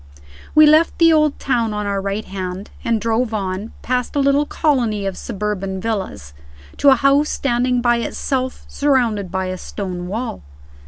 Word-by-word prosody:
We 310 Hz, 0 st, +8 dB
left 310 Hz, +2 st, +4 dB
the 330 Hz, -1 st, +6 dB
Old 305 Hz, -2 st, +3 dB
Town 235 Hz, -5 st, 0 dB
on 210 Hz, 0 st, -2 dB
our 200 Hz, -1 st, -1 dB
right 200 Hz, +2 st, -3 dB
hand, 190 Hz, +1 st, -6 dB
and 230 Hz, -1 st, +1 dB
drove 225 Hz, +1 st, 0 dB
on, 195 Hz, +2 st, -3 dB
past 250 Hz, +2 st, -1 dB
a -, -, +2 dB
little 280 Hz, +1 st, +3 dB
colony 235 Hz, -10 st, 0 dB
of 195 Hz, -1 st, -2 dB
suburban 195 Hz, -3 st, -4 dB
villas, 190 Hz, -, -4 dB, 0.4 s
to 285 Hz, -, +5 dB
a 270 Hz, -, +7 dB
house 275 Hz, +4 st, +3 dB
standing 250 Hz, -1 st, 0 dB
by 240 Hz, -1 st, +3 dB
itself, 255 Hz, +2 st, -3 dB
surrounded 240 Hz, -9 st, +1 dB
by 190 Hz, 0 st, -1 dB
a 185 Hz, 0 st, -4 dB
stone 180 Hz, -3 st, -5 dB
wall. 220 Hz, -, -4 dB
230 Hz, 165 wpm, -19 LUFS, 195-265 Hz, 0.4 s, We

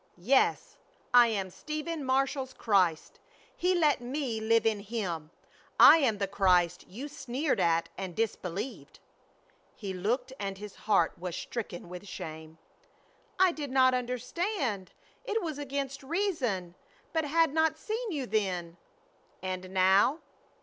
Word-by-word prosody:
"Yes, 245 Hz, +10 st, +2 dB, 0.4 s
I 245 Hz, -1 st, +8 dB
am 195 Hz, -4 st, -2 dB
Stephen 305 Hz, -, -4 dB
Marshall's 265 Hz, 0 st, 0 dB
Christ. 185 Hz, -7 st, +1 dB, 0.4 s
He 365 Hz, +1 st, +1 dB
let 305 Hz, -7 st, +3 dB
me 250 Hz, -2 st, -3 dB
live 230 Hz, +1 st, +3 dB
in 220 Hz, -2 st, +2 dB
Him. 195 Hz, -8 st, -4 dB, 0.5 s
I -, -, +10 dB
am 250 Hz, -9 st, +2 dB
the 200 Hz, -1 st, -1 dB
Christ 180 Hz, -3 st, +2 dB
you 240 Hz, +10 st, -7 dB
sneered 280 Hz, 0 st, -2 dB
at 165 Hz, 0 st, +2 dB
and 185 Hz, -3 st, -5 dB
disbelieved!" 210 Hz, +1 st, -4 dB, 0.8 s
He 200 Hz, -3 st, -5 dB
looked 240 Hz, +8 st, -1 dB
and 195 Hz, -1 st, -4 dB
his 205 Hz, 0 st, -8 dB
heart 200 Hz, -6 st, +2 dB
was 180 Hz, -1 st, -4 dB
stricken 200 Hz, -7 st, -5 dB
with 180 Hz, +3 st, -9 dB
shame. 160 Hz, -2 st, -8 dB, 0.8 s
"I 375 Hz, -1 st, +5 dB
did 295 Hz, -4 st, -5 dB
not 260 Hz, 0 st, +4 dB
understand. 250 Hz, -, -2 dB, 0.3 s
It 445 Hz, -3 st, -1 dB
was 310 Hz, -4 st, -4 dB
against 280 Hz, 0 st, -4 dB
reason. 265 Hz, -, -1 dB, 0.4 s
But 320 Hz, -1 st, +1 dB
had 320 Hz, 0 st, +2 dB
not 320 Hz, 0 st, +2 dB
seen 445 Hz, +5 st, -4 dB
you 285 Hz, -6 st, -2 dB
then." 185 Hz, -6 st, -2 dB, 0.7 s
"And 185 Hz, 0 st, -4 dB
now?" 190 Hz, +8 st, +4 dB
235 Hz, 135 wpm, -30 LUFS, 190-285 Hz, 0.8 s, I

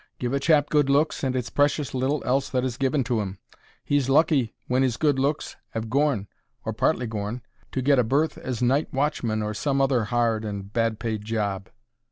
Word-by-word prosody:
Give 125 Hz, +1 st, -2 dB
a 140 Hz, -, +1 dB
chap 145 Hz, 0 st, +3 dB
good 145 Hz, -2 st, +3 dB
looks, 145 Hz, +3 st, +2 dB
and 130 Hz, -1 st, 0 dB
it's 125 Hz, -2 st, -2 dB
precious 145 Hz, -2 st, +1 dB
little 135 Hz, +3 st, 0 dB
else 135 Hz, +2 st, +1 dB
that 125 Hz, -1 st, 0 dB
is 130 Hz, -2 st, -2 dB
given 135 Hz, +1 st, +1 dB
to 120 Hz, -3 st, 0 dB
'im. 95 Hz, -1 st, -5 dB, 0.5 s
He's 145 Hz, -2 st, +1 dB
lucky 140 Hz, -5 st, +3 dB
when 130 Hz, +1 st, +2 dB
'is 125 Hz, -3 st, 0 dB
good 145 Hz, -4 st, +2 dB
looks 145 Hz, +3 st, -1 dB, 0.2 s
'ave 110 Hz, 0 st, -3 dB
gorn—or 135 Hz, -6 st, -2 dB
partly 125 Hz, -, +1 dB
gorn—to 115 Hz, +4 st, -5 dB
get 140 Hz, 0 st, +4 dB
a -, -, +4 dB
berth 140 Hz, +7 st, +1 dB
as 125 Hz, -1 st, -3 dB
night 135 Hz, +5 st, +2 dB
watchman 125 Hz, -6 st, 0 dB
or 105 Hz, 0 st, -2 dB
some 140 Hz, +5 st, 0 dB
other 135 Hz, -4 st, +2 dB
hard 115 Hz, -1 st, +1 dB
and 100 Hz, -1 st, -6 dB
bad 115 Hz, -2 st, +1 dB
paid 110 Hz, -2 st, -3 dB
job. 105 Hz, -3 st, -2 dB
125 Hz, 195 wpm, -25 LUFS, 110-140 Hz, 0.5 s, get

